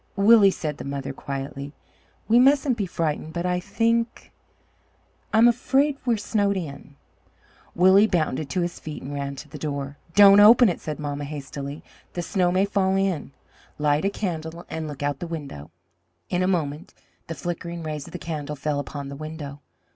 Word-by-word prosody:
"Willie," 205 0 +7
said 155 -6 -4
the - - -5
mother 140 -1 -4
quietly, 140 +1 -6 0.5
"we 230 +2 +5
mustn't 270 0 +4
be 205 -4 -2
frightened, 160 -2 -2
but 170 0 -3
I 180 0 +1
think 230 +4 -1 1.0
I'm 225 +2 +6
afraid 270 +4 +2
we 235 - +4
are - - -4
snowed 205 -1 0
in." 140 -4 -7 0.8
Willie 190 +4 +6
bounded 155 -6 -1
to 180 - -1
his 175 0 -3
feet 155 -1 -7
and 140 +2 -6
ran 140 -1 -4
to 150 - -10
the 150 0 -10
door. 140 -1 -4 0.2
"Don't 200 0 +8
open 225 +2 +8
it!" 175 - -3
said 155 -1 -4
mamma 145 -1 -4
hastily; 140 0 -7 0.3
"the 175 - -3
snow 180 0 +1
may 185 +2 +3
fall 195 -1 +1
in. 190 -7 -1 0.5
Light 150 +1 +1
a 195 - +2
candle 170 -4 -4
and 160 -1 -4
look 145 -2 -7
out 145 -1 -1
the 175 - -5
window." 140 - -7 0.6
In 180 - +1
a 185 - +2
moment 165 -1 -2 0.3
the 165 - -5
flickering 170 +2 -5
rays 150 -2 -5
of - - -11
the - - -5
candle 150 -3 -5
fell 145 +1 -2
upon 145 0 -6
the 140 - -7
window. 150 -1 -7
165 Hz, 180 wpm, -24 LUFS, 145-195 Hz, 1.0 s, Don't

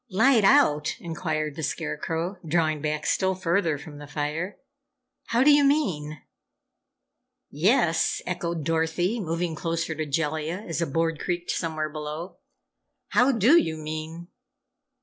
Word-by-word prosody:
"Light 225 +4 +4
out?" 195 - +4
inquired 155 -3 -3
the 160 - -5
Scarecrow, 165 +5 -3
drawing 155 -2 +1
back 150 0 -2
still 190 +3 +1
further 170 -3 0
from 145 +1 -11
the 145 - -9
fire. 150 +6 -3 0.7
"How 235 +2 +2
do 295 - +7
you 290 0 +6
mean?" 170 - 0 1.3
"Yes," 165 - +2
echoed 170 -3 -3
Dorothy, 165 +6 0
moving 170 -2 -2
closer 165 0 -2
to 155 0 -4
Jellia 160 +5 -2
as 165 0 -2
a 170 - 0
board 165 +2 0
creaked 175 0 -2
somewhere 155 -2 -2
below. 155 +3 -6 0.7
"How 250 +3 +4
do 250 - +5
you 160 -1 -3
mean?" 155 +2 -6
165 Hz, 130 wpm, -26 LUFS, 155-185 Hz, 1.3 s, do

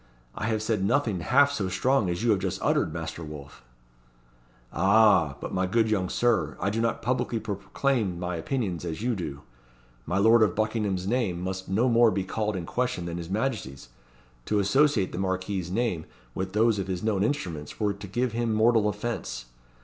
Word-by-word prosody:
I 105 - -3
have 110 -1 0
said 110 -3 0
nothing 105 -3 +1
half 140 - +4
so 100 -9 -2
strong 110 +3 +1
as 85 +4 -2
you 120 - +3
have 100 - +2
just - - -3
uttered, - - +2
Master 80 +1 -5
Wolfe." 75 -4 -10 1.1
"Ah! 95 -6 +4
but, - - -6
my 95 0 +1
good 110 +3 +2
young 95 -4 0
Sir, 110 -12 +1
I 100 - 0
do 115 +2 -1
not 115 -1 -1
publicly 120 -1 0
proclaim 105 0 -1
my 90 0 -3
opinions 95 - -2
as 85 +4 -4
you 120 -1 +1
do. 75 -7 -5 0.7
My 90 - 0
lord 110 +3 +5
of 105 -5 +3
Buckingham's 105 -4 -1
name 105 -5 0
must 95 +1 -4
no 110 +7 +2
more 120 -1 +5
be 100 -3 -1
called 105 +2 -2
in 90 -3 -4
question 125 -4 -2
than 85 0 -4
his 85 0 -7
Majesty's. 100 - -3 0.6
To 105 - 0
associate 105 +1 +3
the - - -5
Marquis's 95 -1 -2
name 95 -6 -1 0.3
with 95 0 -4
those 110 0 +3
of 95 - -3
his 90 -1 -3
known 105 -3 +1
instruments 85 - -3
were 105 -1 +1
to 100 0 -9
give 120 +6 -1
him 115 -1 -1
mortal 110 -1 +4
offence. 105 - -4
100 Hz, 190 wpm, -27 LUFS, 90-115 Hz, 1.1 s, lord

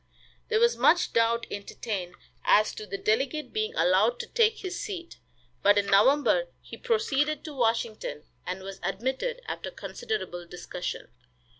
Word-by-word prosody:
There 440 - +2
was 470 +1 +4
much 350 - +4
doubt 230 0 +2
entertained 200 -3 -5 0.3
as 215 +1 +4
to 215 - -8
the 195 +1 -4
delegate 270 +9 0
being 435 +2 -1
allowed - - +3
to - - -7
take 455 -2 +2
his 365 -3 -5
seat, 360 -5 -6 0.4
but 205 +1 +5
in 205 - +3
November 275 - +4
he - - -10
proceeded 305 - 0
to 305 - -6
Washington, 230 - -1 0.2
and 185 +1 -5
was 195 0 -7
admitted, 260 - -2
after - - -4
considerable 435 - -5
discussion. 180 0 -6
265 Hz, 145 wpm, -28 LUFS, -, 0.4 s, but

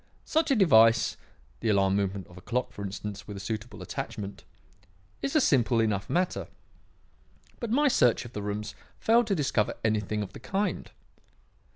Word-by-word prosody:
Such 320 0 +1
a 275 - +4
device 115 - +5 0.4
the - - -1
alarm 95 -2 +3
movement 100 -2 -1
of 90 - -16
a 95 - -11
clock, 125 +6 -2
for 100 - -7
instance, 100 +1 -6
with 105 -2 -7
a - - -6
suitable 105 0 -5
attachment 100 +2 -6 0.8
is 275 +3 -2
a - - +7
simple 125 - +3
enough 100 -3 0
matter, 180 +1 0 1.1
but 235 - -4
my 290 +6 +3
search 125 - +3
of 120 - -10
the 105 - -4
rooms 105 0 -4 0.2
failed 230 +1 +3
to 200 - +1
discover 135 - 0
anything 105 -1 0
of 100 -1 -9
the - - -9
kind. 190 - -2
110 Hz, 170 wpm, -28 LUFS, 100-170 Hz, 1.1 s, a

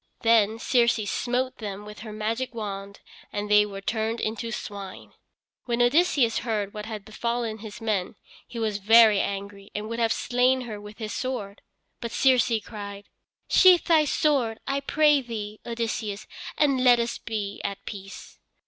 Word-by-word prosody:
Then 225 -1 +4
Circe 235 -2 +2
smote 255 +1 -1
them 205 -2 -6
with 210 0 -10
her 220 0 -8
magic 225 +4 -3
wand 200 -2 -6 0.3
and 210 0 -3
they 210 0 +6
were 195 -1 -7
turned 220 +2 -1
into 225 +1 -3
swine. 200 -3 -7 0.5
When 235 -1 -1
Odysseus 245 -2 +3
heard 210 -4 -2
what 210 0 -6
had 215 -3 -6
befallen 235 0 -3
his 215 0 -9
men 215 -4 -1 0.3
he 235 - -9
was 215 -3 -1
very 220 0 +6
angry 200 0 -4
and 210 +1 -3
would 230 +1 -4
have 230 -1 +2
slain 250 +2 +2
her 215 -4 -7
with 210 0 -11
his 215 -2 -5
sword. 225 -6 -4 0.4
But 235 -2 -5
Circe 255 -2 +3
cried: 200 -1 -8 0.4
"Sheathe 365 -2 +6
thy 315 -2 +4
sword, 270 -7 +1
I 275 0 0
pray 295 0 +3
thee, 215 -4 -6
Odysseus, 225 -3 -3 0.3
and 275 -4 +2
let 245 -2 +6
us 235 0 -2
be 210 -3 -4
at 200 -1 -5
peace." 195 -1 -9
225 Hz, 160 wpm, -26 LUFS, 205-245 Hz, 0.5 s, they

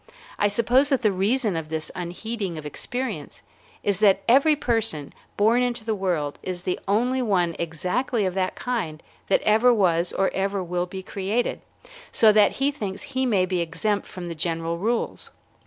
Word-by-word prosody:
I 205 - +4
suppose 235 +7 +3
that 270 -4 +1
the 210 - +4
reason 205 +2 +1
of 160 -1 -4
this 160 0 -4
unheeding 180 +1 -4
of 155 - -7
experience 245 - -5 0.4
is 200 -2 +1
that 195 -2 +4
every 275 +6 +5
person 225 - 0 0.2
born 225 +4 +4
into 245 -3 -2
the 225 - 0
world 175 -8 -2
is 180 -1 -5
the 180 - -1
only 245 +6 +1
one 180 -8 +1
exactly 185 - -1
of 185 - -1
that 185 -1 -1
kind 180 -11 -3 0.2
that - - +2
ever 220 +4 +5
was 175 -6 +2
or 195 - +1
ever 195 0 -1
will 175 0 -2
be 190 +1 -7
created, 200 +6 -2 0.5
so 220 -2 +6
that 210 -1 +5
he 275 +2 +1
thinks 205 -8 -5
he 260 0 +1
may 195 -6 +3
be 180 -1 -1
exempt 205 +5 -1
from 180 -1 -8
the 170 - -4
general 165 +1 -2
rules. 230 +4 -2
200 Hz, 175 wpm, -24 LUFS, 175-235 Hz, 0.5 s, so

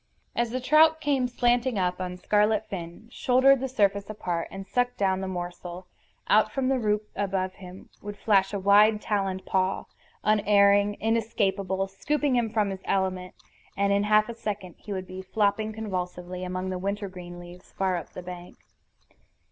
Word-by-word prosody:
As 240 0 +1
the 255 +3 -2
trout 310 +5 +5
came 275 -4 +1
slanting 245 -1 +1
up 180 -1 0
on 180 0 -4
scarlet 210 +3 +2
fin, 175 +3 -7
shouldered 260 +2 +4
the 265 +1 -3
surface 200 -4 +1
apart, 175 -5 -3
and 195 0 -8
sucked 245 +3 0
down 190 -1 +1
the 190 - -3
morsel, 175 0 -6 0.4
out 215 0 +4
from 265 +1 -1
the 265 -1 +2
root 210 -1 0
above 190 -2 -1
him 185 0 -12
would 205 0 -7
flash 195 -2 +2
a 205 - -2
wide 205 +2 +5
taloned 195 -3 -2
paw, 190 0 0 0.4
unerring, 205 -1 +4
inescapable, 200 -4 0
scooping 280 +8 -1
him 235 -2 +1
from 210 -2 0
his 190 -1 -6
element, 185 -1 -1 0.4
and 200 0 +2
in 200 +1 +2
half 215 0 +4
a 235 - -5
second 200 -5 -5
he 210 - -10
would 190 -1 -3
be 185 0 -8
flopping 210 +2 0
convulsively 180 -4 -5
among 185 +1 -3
the 185 - -3
wintergreen 185 -3 -5
leaves, 175 +1 -12
far 190 -1 0
up 170 - -5
the 180 - -8
bank. 180 0 -9
200 Hz, 170 wpm, -27 LUFS, 185-220 Hz, 0.4 s, trout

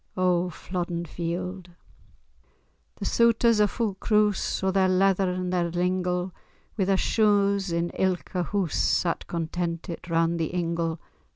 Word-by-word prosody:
O 180 -1 +2
Flodden 175 0 -4
Field! 175 +2 -4 1.3
The - - -6
souters 235 -1 +3
a' 210 - +5
fu' 220 0 -2
croose, 210 0 +1
O'er 190 - +2
their 190 0 +3
leather 190 0 +3
and 180 0 -2
their 175 -1 +1
lingle, 180 +1 -1 0.4
Wi' 195 - +1
their 195 0 +2
shoon 200 -1 +3
in 170 +1 -1
ilka 185 -1 -1
hoose, 195 -5 -1
Sat 170 -2 0
contentit 170 +1 -4
round 165 0 +1
the 165 +2 -2
ingle. 170 -1 -1
180 Hz, 130 wpm, -26 LUFS, 170-195 Hz, 1.3 s, a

